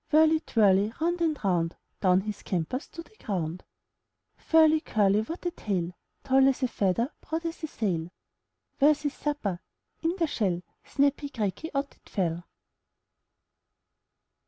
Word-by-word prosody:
Whirly, 315 Hz, +1 st, +5 dB
twirly, 205 Hz, -, +3 dB
Round 345 Hz, +2 st, 0 dB
and 315 Hz, -3 st, +1 dB
round, 175 Hz, -4 st, +1 dB, 0.2 s
Down 185 Hz, -1 st, +4 dB
he 210 Hz, +2 st, -3 dB
scampers 195 Hz, -, -3 dB
To 335 Hz, -, -9 dB
the 435 Hz, -, -24 dB
ground. 180 Hz, -4 st, -3 dB, 0.7 s
HOUSE -, -, -29 dB, 0.3 s
Furly, 315 Hz, 0 st, +1 dB
curly, 205 Hz, -1 st, +3 dB
What 330 Hz, +11 st, -7 dB
a 350 Hz, -, +1 dB
tail! 185 Hz, -, -2 dB, 0.3 s
Tall 265 Hz, 0 st, +5 dB
as 270 Hz, 0 st, +1 dB
a -, -, +4 dB
feather, 230 Hz, -, 0 dB
Broad 325 Hz, +1 st, -4 dB
as 330 Hz, +1 st, -4 dB
a -, -, -1 dB
sail! 175 Hz, -, -2 dB, 0.7 s
Where's 300 Hz, +1 st, +4 dB
his 290 Hz, -1 st, -1 dB
supper? 255 Hz, -12 st, -2 dB, 0.4 s
In 335 Hz, +2 st, 0 dB
the 340 Hz, -, +2 dB
shell, 190 Hz, -, -1 dB, 0.2 s
Snappy, 285 Hz, 0 st, +1 dB
cracky, 230 Hz, -, -3 dB
Out 280 Hz, 0 st, -1 dB
it -, -, -22 dB
fell. 175 Hz, -2 st, -1 dB
235 Hz, 150 wpm, -28 LUFS, 190-310 Hz, 0.7 s, Whirly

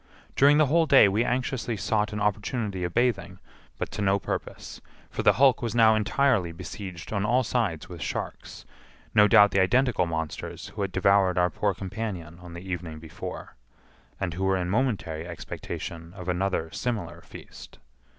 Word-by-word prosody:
During 145 Hz, +2 st, +6 dB
the 155 Hz, -, +5 dB
whole 160 Hz, +3 st, +3 dB
day 135 Hz, -7 st, +7 dB
we 105 Hz, +4 st, +1 dB
anxiously 125 Hz, -2 st, -2 dB
sought 105 Hz, +2 st, 0 dB
an 105 Hz, -, -4 dB
opportunity 105 Hz, -1 st, -1 dB
of 90 Hz, -, -2 dB
bathing, 120 Hz, +1 st, 0 dB, 0.4 s
but -, -, -4 dB
to -, -, -5 dB
no 100 Hz, 0 st, +3 dB
purpose; -, -, -6 dB, 0.3 s
for -, -, -3 dB
the -, -, +5 dB
hulk 130 Hz, -2 st, +4 dB
was 115 Hz, -2 st, -3 dB
now 110 Hz, -2 st, +6 dB
entirely 110 Hz, -3 st, +1 dB
besieged 90 Hz, +2 st, -8 dB
on 100 Hz, -2 st, 0 dB
all 125 Hz, +4 st, +2 dB
sides 110 Hz, -10 st, -1 dB
with 85 Hz, -3 st, -9 dB
sharks—no 105 Hz, +8 st, -2 dB
doubt 105 Hz, 0 st, +6 dB
the 95 Hz, -, +2 dB
identical 105 Hz, 0 st, +2 dB
monsters 80 Hz, -2 st, -5 dB
who 105 Hz, -, -7 dB
had 100 Hz, -1 st, -1 dB
devoured 95 Hz, 0 st, +3 dB
our 90 Hz, 0 st, +3 dB
poor 100 Hz, -2 st, -1 dB
companion 95 Hz, -4 st, -6 dB
on 90 Hz, -1 st, -11 dB
the 90 Hz, +3 st, -9 dB
evening 85 Hz, -3 st, -5 dB
before, 80 Hz, 0 st, -8 dB, 0.6 s
and 95 Hz, -4 st, -2 dB
who 95 Hz, +3 st, -3 dB
were 95 Hz, 0 st, +2 dB
in 90 Hz, 0 st, -2 dB
momentary 100 Hz, -9 st, -1 dB
expectation 85 Hz, 0 st, -7 dB
of 90 Hz, -2 st, -9 dB
another 90 Hz, -2 st, -1 dB
similar 105 Hz, -9 st, -4 dB
feast. -, -, -13 dB
100 Hz, 170 wpm, -26 LUFS, 90-115 Hz, 0.6 s, day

